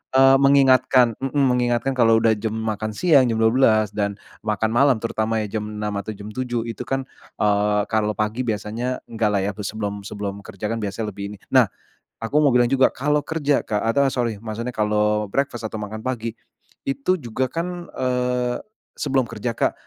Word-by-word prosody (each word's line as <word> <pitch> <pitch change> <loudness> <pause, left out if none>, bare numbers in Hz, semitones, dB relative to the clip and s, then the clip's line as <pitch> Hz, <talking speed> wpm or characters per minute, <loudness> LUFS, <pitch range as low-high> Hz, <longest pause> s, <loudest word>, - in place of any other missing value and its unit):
eee, 135 0 +7
mengingatkan 130 -4 +4
mhm, 135 +1 -4
mengingatkan 120 0 +1
kalau 115 -2 +5
udah 115 - +4
jam 110 +1 -3
makan 110 -1 -3
siang, 140 -3 +4
jam 115 - 0
12.00 110 -2 +4
dan 100 -1 -2 0.3
makan 110 +1 0
malam 130 +2 +4
terutama 110 -1 -1
ya 105 +1 -3
jam 105 - -5
6.00 105 0 -4
atau 105 +2 -6
jam 100 +2 -9
7.00. 120 0 -2
Itu 115 +2 -6
kan, 135 +1 -1 0.4
eee, 105 0 +2
kalau 105 -1 +1
pagi 110 +4 -2
biasanya 115 +4 -2
enggak 110 -2 +1
lah 100 - +2
ya, 100 - 0
sebelum 100 -1 -4
sebelum 100 -1 -5
kerja 105 +1 -5
kan 115 - -2
biasanya 105 +1 -3
lebih 100 +1 -7
ini. - - -15
Nah, - - +6 0.5
aku 115 +6 -1
mau 140 -4 +4
bilang 120 -1 +4
juga 135 0 +3
kalau 150 +2 0
kerja, 150 -3 0
Kak, 105 -2 -1
atau, 115 +5 +2
eee, 135 - 0
sorry 120 -3 0
maksudnya 115 +3 -5
kalau 105 0 +1
breakfast 135 -3 -1
atau 110 0 -5
makan 110 +2 -6
pagi 115 -3 -3 0.5
itu 140 +7 0
juga 130 -2 -2
kan, 175 +3 -4
eee, 125 -1 0 0.4
sebelum 135 -3 0
kerja, 115 +1 -4
Kak. - - +1
115 Hz, 185 wpm, -22 LUFS, 105-130 Hz, 0.5 s, eee